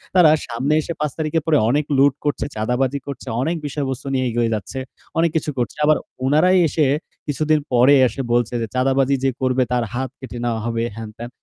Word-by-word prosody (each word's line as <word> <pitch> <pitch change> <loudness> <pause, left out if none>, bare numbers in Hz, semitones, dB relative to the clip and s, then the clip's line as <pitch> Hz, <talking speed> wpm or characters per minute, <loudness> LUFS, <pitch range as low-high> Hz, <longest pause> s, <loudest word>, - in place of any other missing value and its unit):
তারা 175 -4 +7 0.2
সামনে 130 +6 -1
এসে 170 - -5
৫ 150 -1 -1
তারিখের 155 0 -1
পরে 155 -2 +3
অনেক 145 +4 +1
লুট 140 0 +5
করছে, 145 -1 0
চাঁদাবাজি 125 +5 0
করছে, 140 -1 -7
অনেক 165 +6 0
বিষয়বস্তু 140 -2 -3
নিয়ে 130 -1 +1
এগিয়ে 115 0 0
যাচ্ছে, 105 +6 -5 0.4
অনেক 165 0 +3
কিছু 155 -1 0
করছে। 120 -4 -2
আবার 155 0 +4 0.3
ওনারাই 155 +7 +4
এসে 150 +1 +1 0.4
কিছুদিন 155 +1 +1
পরে 125 +4 +6
এসে 120 +4 -4
বলছে 120 0 +1
যে, 115 - -2
"চাঁদাবাজি 135 +1 +2
যে 135 - +3
করবে, 130 0 +2
তার 120 - +1
হাত 130 +1 -2
কেটে 125 -2 -8
নেওয়া 115 -2 -1
হবে।" 115 0 -1
হ্যান-ত্যান। 115 +1 -8
135 Hz, 190 wpm, -21 LUFS, 120-150 Hz, 0.4 s, তারা